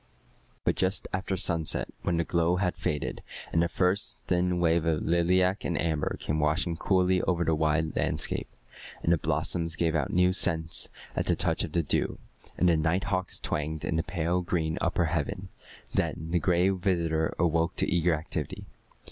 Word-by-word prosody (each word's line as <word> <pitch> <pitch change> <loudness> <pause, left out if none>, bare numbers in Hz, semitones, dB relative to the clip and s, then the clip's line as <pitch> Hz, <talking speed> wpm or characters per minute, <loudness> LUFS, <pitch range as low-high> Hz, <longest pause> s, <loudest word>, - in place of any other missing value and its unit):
"] - - -36
But - - +2
just 95 +1 +1
after 95 0 -1
sunset, 80 -3 +1
when 85 - 0
the 85 - +2
glow 85 +1 +1
had 90 -1 0
faded, 75 -1 -2 0.3
and 80 - +4
the 85 - +2
first 90 +3 0
thin 90 0 +1
wave 85 -1 +3
of 80 -2 0
lilac 90 +3 +2
and 85 -4 -1
amber 80 -1 -1
came 75 +1 -1
washing 80 +3 +1
coolly 90 +1 +2
over 85 -2 +1
the 80 - +2
wide 80 +1 +1
landscape, - - -1 0.6
and 85 - +4
the 85 - +1
blossoms 80 +1 -1
gave 80 -1 +1
out 75 -5 0
new 90 +1 +3
scents 80 -3 -1 0.3
at - - -1
the - - +3
touch - - +1
of - - -5
the 85 - +2
dew, - - 0 0.4
and 90 - +3
the 85 -2 +4
night 80 +4 +1
hawks 95 -2 -1
twanged 75 +1 -3
in 80 - -1
the 80 - +2
pale 85 +1 -1
green 80 -2 -1
upper 85 0 +1
heaven, 85 +4 -2 0.4
then 80 +1 -1
the 90 - +3
Gray 90 +1 +3
Visitor 85 -4 0
awoke 85 -1 +1
to - - +2
eager 85 -1 +2
activity. 80 -2 -5
85 Hz, 180 wpm, -28 LUFS, 80-90 Hz, 0.6 s, and